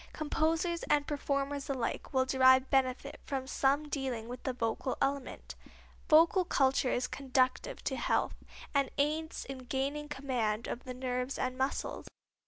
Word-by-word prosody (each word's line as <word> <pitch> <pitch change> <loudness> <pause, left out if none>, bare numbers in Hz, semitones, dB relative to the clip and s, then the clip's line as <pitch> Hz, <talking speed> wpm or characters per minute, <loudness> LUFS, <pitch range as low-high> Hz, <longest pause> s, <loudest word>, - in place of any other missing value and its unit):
Composers 325 +3 0
and 290 -1 +3
performers 280 -1 -2
alike 255 -4 -2
will 260 -1 +2
derive 260 0 +5
benefit 260 -1 0
from 270 -2 -3
some 280 +3 +1
dealing 260 -6 -3
with 245 +1 -7
the 265 - -1
vocal 240 +1 -2
element. 275 -1 -2 0.6
Vocal 335 +4 +6
culture 270 -5 +2
is 250 - 0
conducive 260 - 0
to - - -1
health, - - +1 0.4
and 280 -2 +2
aids 310 +3 -1
in 270 -1 -7
gaining 275 +4 -3
command 245 -6 -1
of 240 - -5
the 255 -1 -6
nerves 250 +1 -2
and 255 0 -1
muscles. 265 +1 -2
270 Hz, 145 wpm, -32 LUFS, 255-285 Hz, 0.6 s, Vocal